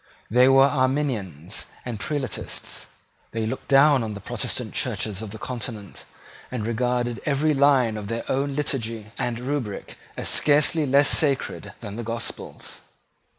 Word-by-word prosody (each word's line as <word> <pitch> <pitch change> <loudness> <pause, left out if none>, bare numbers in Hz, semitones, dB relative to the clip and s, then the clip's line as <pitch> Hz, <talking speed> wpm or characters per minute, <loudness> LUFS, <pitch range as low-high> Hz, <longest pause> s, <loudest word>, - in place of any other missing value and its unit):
They 125 +3 +6
were 135 0 +7
Arminians 130 - -1 0.2
and 120 -4 -4
Prelatists. 140 0 -4 0.5
They 110 -1 -1
looked 130 +4 -4
down 140 0 +6
on 110 -2 -3
the - - -6
Protestant 100 - -3
Churches 105 -2 -2
of 110 - -6
the 110 - -7
Continent, 115 -5 -6 0.4
and 115 -4 -3
regarded 120 +1 -1
every 150 +1 +2
line 135 -5 +4
of 105 -1 -6
their 115 +2 -3
own 140 +1 0
liturgy 115 -7 -3
and 120 -1 -1
rubric 125 -5 -4 0.2
as - - -3
scarcely 150 +1 +4
less 140 +2 +5
sacred 140 -4 +1
than 105 -2 -7
the 120 - -4
gospels. 115 +1 -5
125 Hz, 145 wpm, -24 LUFS, 110-140 Hz, 0.5 s, were